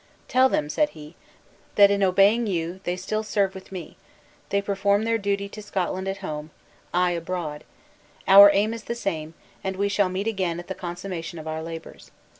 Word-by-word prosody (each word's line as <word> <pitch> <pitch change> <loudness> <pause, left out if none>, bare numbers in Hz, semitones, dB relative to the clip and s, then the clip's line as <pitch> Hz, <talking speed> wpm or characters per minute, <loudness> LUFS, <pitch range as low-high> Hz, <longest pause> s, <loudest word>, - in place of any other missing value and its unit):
"Tell 260 +1 +4
them," 150 - 0
said 295 - +1
he, 150 +1 -11 0.6
"that 200 -1 +7
in 200 0 +1
obeying 200 +5 +4
you 175 -1 -2
they 175 - 0
still 215 +4 -2
serve 200 -3 0
with 190 0 -11
me, 180 -4 -8 0.5
they 200 - +2
perform 200 +1 +1
their 230 0 +1
duty 200 -1 -1
to 215 - -9
Scotland 190 -2 -2
at 195 0 -2
home 150 -1 -5 0.4
I 180 0 +2
abroad; 165 -3 -4 0.6
our 200 +1 +10
aim 205 +3 +1
is 230 -1 -8
the 235 - -3
same; 165 -8 -4 0.3
and 190 0 -2
we 200 +1 0
shall 200 -1 +2
meet 190 +2 -3
again 185 -6 -1
at 175 - -8
the 190 - -3
consummation 175 -2 -6
of 160 0 -8
our 160 0 -3
labors." 165 0 -9
190 Hz, 190 wpm, -25 LUFS, 170-200 Hz, 0.6 s, our